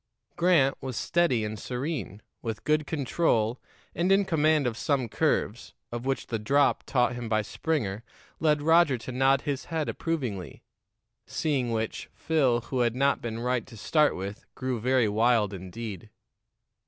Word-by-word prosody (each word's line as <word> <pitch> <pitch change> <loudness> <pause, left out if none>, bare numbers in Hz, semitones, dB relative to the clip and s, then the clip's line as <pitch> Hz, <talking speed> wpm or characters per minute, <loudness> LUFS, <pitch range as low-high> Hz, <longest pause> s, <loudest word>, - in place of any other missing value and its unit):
Grant 170 -6 +3
was 130 -3 -5
steady 135 -11 +1
and 105 0 -5
serene, 125 - -4 0.2
with 115 -2 -5
good 150 -1 +1
control 130 -6 0 0.3
and 175 +4 +1
in 195 +1 +4
command 155 -4 +2
of 120 -2 -1
some 135 0 0
curves, 125 -3 -1 0.2
of 120 +2 -5
which 135 - -1
the 115 - -3
drop 140 +7 +2
taught 125 -2 +2
him 120 -2 -5
by 110 -1 +2
Springer 110 -5 -2 0.4
led 150 -2 +2
Roger 160 -4 +5
to 120 - -7
nod 135 +2 +3
his 140 -4 -3
head 160 -3 -2
approvingly; 125 - -3 0.6
seeing 135 -6 -1
which, 110 -1 -3
Phil, 135 -7 +2
who 130 +2 -4
had 120 -1 +2
not 140 +2 +2
been 115 -1 -4
right 125 -2 -1
to 115 -4 -12
start 150 +7 +2
with, 100 +3 -6
grew 130 -2 -2
very 125 0 +2
wild 110 -1 +2
indeed. 95 +2 -7
125 Hz, 155 wpm, -27 LUFS, 115-150 Hz, 0.6 s, Roger